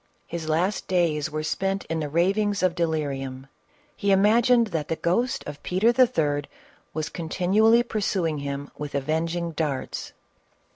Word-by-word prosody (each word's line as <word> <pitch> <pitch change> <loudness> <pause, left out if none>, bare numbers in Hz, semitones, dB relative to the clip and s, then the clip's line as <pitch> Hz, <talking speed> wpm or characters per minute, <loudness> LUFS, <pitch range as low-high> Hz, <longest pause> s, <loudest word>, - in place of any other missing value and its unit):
His 165 -2 -5
last 180 +6 0
days 165 -4 +1
were 155 0 -3
spent 195 +4 -1
in 165 0 -2
the 150 -2 -3
rav 170 +6 +2
ings 205 -2 0
of 185 -2 +3
delirium; 140 -6 -2 0.5
he 200 - -1
imagined 230 +5 +5
that 160 -5 -2
the 165 - -1
ghost 235 +10 0
of 150 0 -8
Peter 190 +6 +2
III. 155 - +2 0.5
was 155 -1 -3
continually 200 +7 +3
pursuing 190 - -1
him 140 0 -5
with 145 -1 -6
avenging 165 +4 -1
darts. 150 -4 -3
170 Hz, 145 wpm, -25 LUFS, 150-195 Hz, 0.5 s, imagined